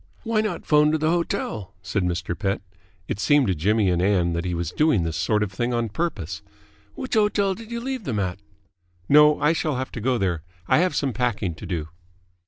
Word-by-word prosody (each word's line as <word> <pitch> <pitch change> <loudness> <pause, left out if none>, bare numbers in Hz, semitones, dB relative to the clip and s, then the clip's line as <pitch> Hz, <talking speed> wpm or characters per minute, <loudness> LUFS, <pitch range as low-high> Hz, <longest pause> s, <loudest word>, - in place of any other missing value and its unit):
"Why 225 -2 +1
not 215 - -3
phone 150 0 +4
to - - +3
the 155 +1 +1
hotel?" 140 - -2
said 100 +1 -1
Mr. 90 -1 -2
Pett. 100 +2 -2 0.4
It - - -3
seemed 145 +4 +4
to 95 - +1
Jimmy 100 +4 +2
and 85 -1 +1
Ann 90 -3 +2
that 85 +1 -2
he 90 -1 -1
was 85 -1 -3
doing 150 - +2
this 80 -1 -2
sort 105 +7 +1
of 100 - -3
thing 120 +5 -1
on 115 -1 -1
purpose. 105 - -3 0.5
"Which 260 - -5
hotel 210 -3 +2
did 225 +3 -11
you 235 0 -3
leave 255 -2 -4
them 115 -5 -2
at?" 95 -2 -2 0.7
"No, 150 +1 +6
I 150 +2 +3
shall 155 -3 -1
have 130 +1 -3
to 115 - -6
go 125 +2 +1
there. 90 -6 -1 0.3
I - - +4
have 180 +1 +1
some 135 -3 0
packing 110 -8 -1
to - - -9
do." 80 -4 -3
115 Hz, 215 wpm, -24 LUFS, -, 0.7 s, No